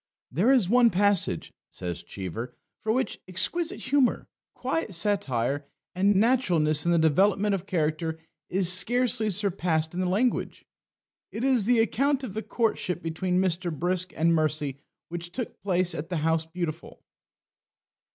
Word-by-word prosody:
"There 190 - +3
is 250 -9 +4
one 240 +3 +5
passage," 195 - +1 0.2
says 90 -2 -5
Cheever, 110 +6 -7 0.3
"which 220 +1 0
for - - -39
exquisite 340 - -1
humour, 265 -1 +1 0.3
quiet 255 - -2
satire, 145 - 0 0.3
and 195 +3 +2
naturalness 185 - +2
in - - +3
the 170 - +4
development 195 +6 +3
of 195 -1 -3
character 160 -2 -1 0.3
is 185 -1 +4
scarcely 220 +3 +2
surpassed 175 -5 0
in 180 - -4
the 185 -1 0
language. 230 +7 -1 0.7
It 225 - -5
is 260 -6 +3
the 245 +2 +3
account 270 +5 +1
of 230 -7 -5
the 220 - -3
courtship 220 -7 -1
between 180 +3 -1
Mr. 180 -1 0
Brisk 180 +3 -1
and 165 +1 +3
Mercy 150 -3 -1 0.3
which 175 0 -6
took 245 +3 -6
place 185 -2 +1
at 160 +3 -5
the 180 - -2
House 160 +1 0
Beautiful." 165 -1 -6
185 Hz, 145 wpm, -26 LUFS, 160-220 Hz, 0.7 s, one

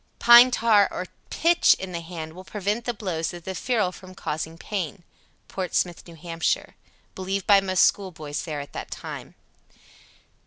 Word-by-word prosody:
Pine 240 +1 +9
tar 225 -4 +4
or 180 - -5 0.2
pitch 340 +1 +4
in 190 -1 -7
the 170 - -3
hand 165 -2 -7
will 185 +2 -10
prevent 210 +4 -3
the 240 - -1
blows 175 -6 -3
of 175 - -10
the 190 - -5
ferule 215 -3 0
from 185 0 -13
causing 160 0 -4
pain. 180 -2 -4 0.4
(Portsmouth, 180 -2 -2
N.H., 165 - -13
sixty 175 - -13 0.2
years - - +4
ago.) - - -15 0.4
Believed 190 +1 -3
by 200 -1 +6
most 185 -1 +2
schoolboys 160 -7 -1
there 155 -3 -5
at 140 - -11
that - - -6
time. - - -8
185 Hz, 170 wpm, -25 LUFS, 170-205 Hz, 0.4 s, Pine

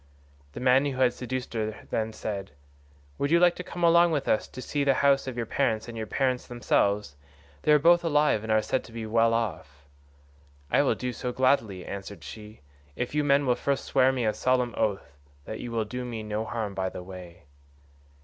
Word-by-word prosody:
"The - - -7
man 130 +2 +4
who 135 -2 -3
had 125 -2 +4
seduced 130 0 -5
her 110 -1 -4
then 110 0 -1
said, 100 -3 -5 0.7
'Would 140 - 0
you 170 +2 +5
like 175 0 +5
to 180 - -5
come 175 0 -6
along 170 0 +6
with 145 -3 -1
us 110 - +1
to - - -11
see 145 +2 -2
the 135 -1 +3
house 135 -1 +4
of 130 -2 -5
your 120 - -1
parents 110 -3 0
and 120 - -8
your 110 -1 -4
parents 130 0 -1
themselves? 105 -8 0 0.5
They - - +2
are 150 - +8
both 170 +3 +5
alive 150 -8 +2
and 110 0 -4
are 110 0 +3
said 125 +4 -1
to - - -14
be 115 -1 -6
well 115 +1 +3
off.' 75 -11 -4 0.9
"'I - - +4
will - - +2
do 125 0 -4
so 125 +2 -4
gladly,' 120 -8 +1
answered 100 0 -7
she, 105 0 -10 0.3
'if 125 +2 -3
you 150 0 +1
men 140 0 +3
will 125 - +3
first 140 +2 -2
swear 130 -1 +3
me 125 -3 -1
a 110 - +2
solemn 125 -2 +1
oath 95 -9 -2 0.3
that 110 - -6
you 120 - -6
will 115 -2 -1
do 125 +4 -5
me 115 -3 -5
no 105 +1 -3
harm 110 -2 -3
by 95 -1 -2
the 90 - -8
way. 90 -1 -11
120 Hz, 215 wpm, -27 LUFS, 110-135 Hz, 0.9 s, are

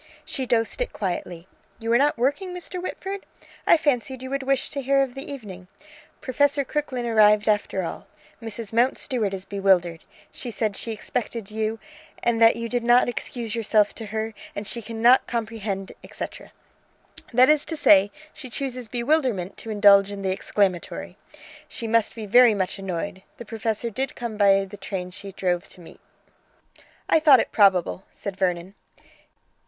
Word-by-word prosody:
She 260 -2 -3
dosed 230 - +1
it - - -2
quietly. 175 -3 -4 0.3
"You 230 0 -1
are - - +6
not 290 -1 +2
working, 290 +10 -1
Mr. 360 0 -5
Whitford? 385 +2 -5 0.4
I - - +7
fancied 260 -4 -1
you 260 - -6
would 275 0 -1
wish 270 0 0
to 280 - -3
hear 275 +1 +3
of 260 -2 -5
the 270 +2 -8
evening. 195 -9 -9 0.5
Professor 280 +2 +1
Crooklyn 260 -4 -3
arrived 210 -2 +4
after 205 -3 +1
all! 165 - -6 0.3
Mrs. 225 -1 -6
Mountstuart 240 -2 +1
is 190 -1 -6
bewildered: 190 -4 +1 0.3
she 250 - -6
says 215 -2 -2
she 230 - -3
expected 225 -1 -4
you, 220 +1 -2 0.5
and 235 -1 +1
that 225 0 +7
you 230 0 -4
did 245 0 -1
not 240 +1 +5
excuse 240 -2 -4
yourself 215 -2 +2
to 225 - -6
her, 220 +1 -3 0.2
and 205 - -4
she 235 +4 -2
cannot 230 +3 +3
comprehend, 220 -4 -4
et - - -12
caetera. - - -7 0.8
That 255 +2 +5
is 305 -1 +4
to 325 - -4
say, 200 -8 +6 0.2
she 275 -5 -10
chooses 250 -1 -5
bewilderment 240 - 0
to 225 - -8
indulge 200 -2 +6
in 200 -1 -6
the 190 - 0
exclamatory. 190 -2 -1 0.5
She 230 - -5
must 225 -1 +1
be 220 -2 -6
very 240 +1 +6
much 190 0 -2
annoyed. 190 +1 -4 0.2
The 235 - -9
professor 225 +1 -3
did 265 +4 -3
come 235 -2 -5
by 195 -1 +4
the 200 +2 -11
train 190 -2 -5
she 200 +1 -9
drove 180 -1 -1
to - - -12
meet!" 165 - -14 1.1
"I - - +4
thought 295 -5 +7
it - - -1
probable," 190 -2 +3
said 200 -2 -6
Vernon. 180 -1 -1
225 Hz, 170 wpm, -24 LUFS, 200-255 Hz, 1.1 s, I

